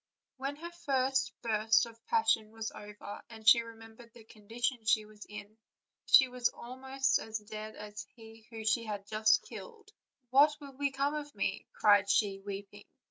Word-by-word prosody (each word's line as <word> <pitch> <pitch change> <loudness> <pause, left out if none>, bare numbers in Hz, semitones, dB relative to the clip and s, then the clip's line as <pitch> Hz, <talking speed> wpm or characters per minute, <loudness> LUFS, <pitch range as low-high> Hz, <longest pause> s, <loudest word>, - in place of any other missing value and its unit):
When 275 +2 -3
her 340 +3 -8
first 270 -5 0
burst 220 0 +3
of 230 0 -14
passion 240 - +2
was 225 0 -5
over 210 -1 -9
and 220 -1 -12
she 235 0 +9
re 230 0 -10
membered 225 +1 -14
the 235 - -13
condition 225 +3 -3
she 215 0 +3
was 210 -1 -13
in, 210 +1 -10 0.5
she 265 - +8
was 250 -1 0
almost 265 +2 -1
as 220 0 -4
dead 215 0 -8
as 210 -1 -8
he 225 -1 -15
whom 225 -1 -7
she 230 +2 +1
had 205 -2 -5
just 215 +1 +3
killed. 435 -3 -11 0.4
"What 290 +3 +6
will 280 -2 -11
be 280 +1 0
come 275 +2 -1
of 295 -1 -6
me?" - - -2
cried 205 -1 +4
she, 200 -1 +2
weeping. 200 +1 -8
225 Hz, 175 wpm, -32 LUFS, 215-265 Hz, 0.5 s, she